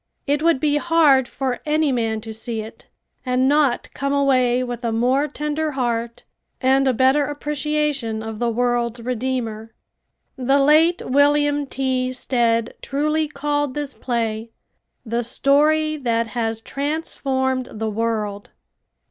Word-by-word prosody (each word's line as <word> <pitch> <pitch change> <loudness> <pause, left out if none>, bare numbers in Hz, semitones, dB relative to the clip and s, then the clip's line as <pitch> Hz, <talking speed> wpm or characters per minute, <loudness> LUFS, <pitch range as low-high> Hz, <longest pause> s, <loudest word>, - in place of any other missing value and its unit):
It 290 +1 0
would 330 -4 +3
be 295 +1 +2
hard 295 -5 +4
for 260 -2 -3
any 305 -1 +1
man 225 -3 -1
to 220 0 -7
see 225 0 -4
it 220 +1 -12 0.3
and 255 0 +1
not 285 -3 +1
come 275 0 -2
away 255 -3 +2
with 245 -1 -5
a 230 - 0
more 255 +6 +2
tender 300 +1 -3
heart 235 -3 -2 0.4
and 265 +1 +3
a - - +4
better 265 +4 +3
appreciation 295 -5 -2
of 220 -1 -6
the 240 - +1
world's 240 0 0
Redeemer. 230 -2 -3 0.6
The 265 +2 +2
late 310 +5 +4
William 290 +1 +2
T. 260 -1 -1
Stead 235 -3 0
truly 305 +2 0
called 290 -1 -2
this 290 -2 -3
play 230 -2 -2 0.6
"The 235 +1 -1
Story 305 +5 +2
That 230 -4 0
Has 225 -1 -1
Transformed 265 -3 -2
the 220 0 -3
World." 210 -2 -2
260 Hz, 135 wpm, -21 LUFS, 235-290 Hz, 0.6 s, hard